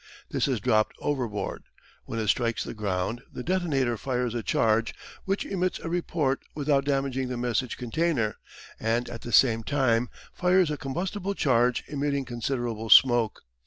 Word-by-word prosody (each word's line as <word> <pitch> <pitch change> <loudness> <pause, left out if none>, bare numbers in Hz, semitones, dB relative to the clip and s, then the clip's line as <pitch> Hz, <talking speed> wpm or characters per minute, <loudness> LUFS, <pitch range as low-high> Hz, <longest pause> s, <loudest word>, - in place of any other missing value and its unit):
This - - +1
is 130 -5 0
dropped 110 -1 +2
overboard. 120 -9 -3 0.4
When - - -5
it 110 -2 -1
strikes 115 0 +1
the - - -6
ground 105 +2 -2
the 125 - -6
detonator 145 -9 0
fires 125 -1 -2
a 120 - -2
charge 110 +1 +1 0.3
which 195 +1 -1
emits 185 -2 -1
a 165 - -6
report 160 -6 0
without 140 -2 +1
damaging 135 -2 0
the 125 -1 -4
message 120 0 -1
container, 125 -3 0 0.4
and 115 +2 0
at 115 - -7
the 120 - -7
same 115 -2 +5
time 125 -2 +1 0.2
fires 180 -2 +3
a - - -1
combustible 185 +8 -3
charge 125 -5 +2
emitting 140 -1 -1
considerable 120 -2 -3
smoke. 120 -4 +5
125 Hz, 155 wpm, -27 LUFS, 115-145 Hz, 0.4 s, same